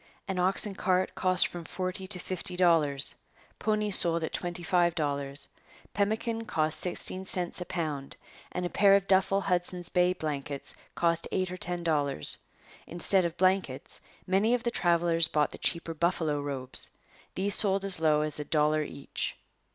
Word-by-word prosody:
An 190 -2 -2
ox 185 +4 +3
and 205 -2 -5
cart 185 0 +1
cost 185 -1 +3
from 175 -1 -6
forty 185 +3 -5
to 190 -1 +1
fifty 180 0 -4
dollars. 155 -6 +4 0.5
Ponies 210 -2 +2
sold 170 -1 +4
at 160 - -4
twenty 175 -1 -4
five 175 0 +2
dollars. 140 -2 -1 0.5
Pemmican 225 +3 -1
cost 155 -6 -1
sixteen 185 +1 -2
cents 180 -1 -3
a - - -3
pound, 150 -6 -4 0.3
and 180 - -3
a - - -2
pair 200 -1 +5
of 200 -1 +2
duffel 195 +1 +3
Hudson's 180 -1 +1
Bay 180 0 +3
blankets 145 -4 -4 0.2
cost 170 -1 +1
eight 185 -1 -1
or 180 - -5
ten 175 -1 -2
dollars. 145 - -1 0.5
Instead 180 +2 +2
of 170 0 -3
blankets, 185 -8 0 0.2
many 200 +6 +2
of 245 - -4
the 235 - 0
travellers 170 -3 +3
bought 150 -3 +1
the - - -10
cheaper 170 -1 -2
buffalo 160 -2 0
robes. 135 -3 -3 0.5
These 200 +2 0
sold 195 -1 +3
as 190 -4 +1
low 155 -2 +3
as 150 -1 -3
a - - -2
dollar 150 0 +2
each. 140 -2 -5
175 Hz, 165 wpm, -29 LUFS, 155-190 Hz, 0.5 s, pair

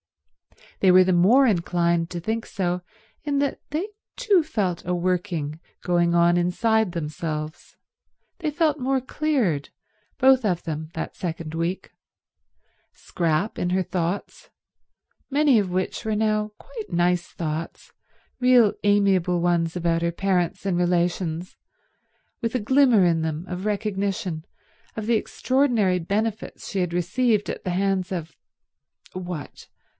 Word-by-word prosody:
They 190 - +5
were 185 +1 +7
the 185 0 +2
more 215 +11 +5
inclined 170 -4 +1
to 175 - -5
think 220 +6 -3
so 180 -2 -2 0.4
in 290 -3 -1
that 280 0 0
they 330 +8 -2 0.3
too 420 -8 +3
felt 205 - -2
a 180 +1 -1
working 175 -4 -2 0.2
going 175 -1 +2
on 170 0 +4
inside 210 +3 +1
themselves: 155 -1 -5 0.6
they 320 -3 -1
felt 300 -1 +1
more 265 +1 +1
cleared, 255 - -1 0.5
both 265 -1 +5
of 180 -5 0
them, 155 -2 -4
that 160 - -4
second 165 -3 -5
week—Scrap 170 +1 -5
in 180 - 0
her 185 +1 +1
thoughts, 175 +2 -3 0.8
many 280 -4 +4
of 200 -3 -1
which 185 +4 -2
were 220 -1 -1
now 215 0 +1
quite 450 -4 -9
nice 175 0 +1
thoughts, 160 0 -5 0.5
real 250 -4 +5
amiable 195 -4 +3
ones 170 -1 +1
about 165 -1 0
her 170 0 +1
parents 180 0 -1
and 180 -3 +1
relations, 175 0 -1 0.8
with 230 +1 -2
a - - +2
glimmer 245 -3 +4
in 165 -2 +2
them 160 +1 -3
of 180 +3 -4
recognition 195 -5 -2 0.5
of 220 - -4
the 235 - +2
extraordinary 230 -6 +1
benefits 210 +5 -3
she 195 - -1
had 180 -2 0
received 205 +5 +1
at - - -8
the 185 - -3
hands 190 0 0
of—what? 170 +1 -9
185 Hz, 130 wpm, -24 LUFS, 170-220 Hz, 0.8 s, were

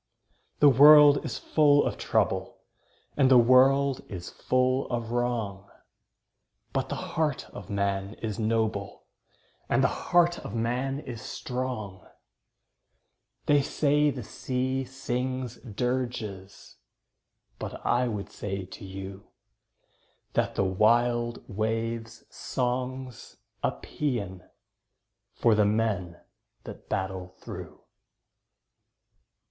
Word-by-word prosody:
The 145 - +9
world 145 +2 +8
is - - -4
full 145 -2 +4
of - - -1
trouble, - - 0 0.6
And 135 -2 +4
the 130 - +7
world 130 +3 +5
is 90 -3 -7
full 130 +1 +1
of 115 -2 -3
wrong, 115 -5 -2 1.0
But - - -1
the - - -2
heart 155 -4 -2
of 100 - -10
man 100 0 -1
is 110 -1 -5
noble, 110 -2 -1 0.7
And - - +3
the - - +6 0.2
heart 175 0 +4
of 105 - -7
man 125 +4 -1
is 115 -6 -8
strong! 125 -7 -5 1.4
They 145 -1 +4
say 150 +1 +2
the 130 -4 -4
sea 130 +3 -2
sings 130 -1 -3
dirges, 115 -5 -4 0.8
But - - -7
I 125 +1 +2
would 105 -4 -4
say 100 -2 -5
to 95 +1 -11
you 95 0 -8 1.1
That - - 0
the 100 - +1
wild 120 +4 +2
wave's 115 +1 -3
song's 125 0 -3 0.2
a - - +2
paean 100 -11 -4 0.9
For 115 - +3
the 105 -1 +4
men 100 -5 -1 0.4
that - - -11
battle 95 -1 -3
through. - - -9
120 Hz, 105 wpm, -27 LUFS, 100-130 Hz, 1.4 s, The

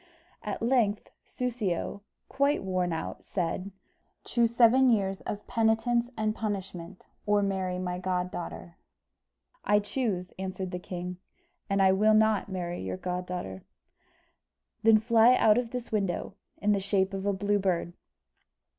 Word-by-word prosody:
At 210 +1 -4
length, 230 -4 +1 0.2
Soussio, 220 -6 -2 0.3
quite 280 -1 +1
worn 185 -2 0
out, 160 0 -4
said, 180 +1 -2 0.5
"Choose 235 -1 +1
seven 250 +2 +6
years 195 -4 +1
of 205 - -4
penitence 230 +2 +1
and 215 -1 0
punishment, 195 -4 -5 0.2
or 205 0 +3
marry 190 -2 -1
my 180 -1 -3
goddaughter." 180 -1 -4 0.9
"I 210 - +4
choose," 205 -4 -2
answered 190 -1 -4
the 180 - -4
king; 180 0 -6 0.5
"and 195 0 +3
I 190 - +6
will 215 +3 +4
not 215 -2 +3
marry 175 -2 -4
your 95 0 -4
goddaughter." 180 - -4 1.2
"Then 220 0 +6
fly 230 +2 +5
out 215 0 +5
of 240 -2 -3
this 245 0 -6
window, 195 -4 -1 0.2
in 210 +1 +1
the 200 - +2
shape 195 0 0
of 195 +1 -3
a - - +3
Blue 205 +1 +1
Bird." 175 -3 -1
200 Hz, 135 wpm, -28 LUFS, 180-220 Hz, 1.2 s, seven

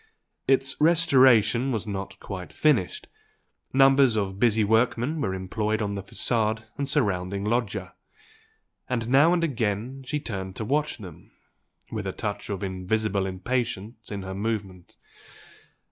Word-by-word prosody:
Its 135 0 +2
"restoration" 130 -7 +5
was 110 -3 -2
not 100 -1 -5
quite 95 -3 -7
finished; 130 - +1 0.7
numbers 135 -2 +5
of 100 -2 -2
busy 110 -2 +3
workmen 120 +7 +1
were 95 -5 -1
employed 105 +3 -2
on 105 -2 -2
the 100 - -4
facade 110 +2 0
and 140 -1 -2
surrounded 100 -8 0
loggia; 105 -4 -1 1.0
and 115 -3 -1
now 140 +6 +5
and 175 -1 +2
again 120 -2 -2
she 150 +3 -2
turned 95 -7 -5
to 110 - -4
watch 150 +5 0
them 90 -8 -12 0.6
with - - -4
a - - -1
touch - - -4
of 100 -1 -3
invisible 95 +1 -1
impatience 110 +2 -3
in 100 -1 -4
her 95 0 -5
movement. 100 -3 -4
110 Hz, 135 wpm, -26 LUFS, 100-130 Hz, 1.0 s, restoration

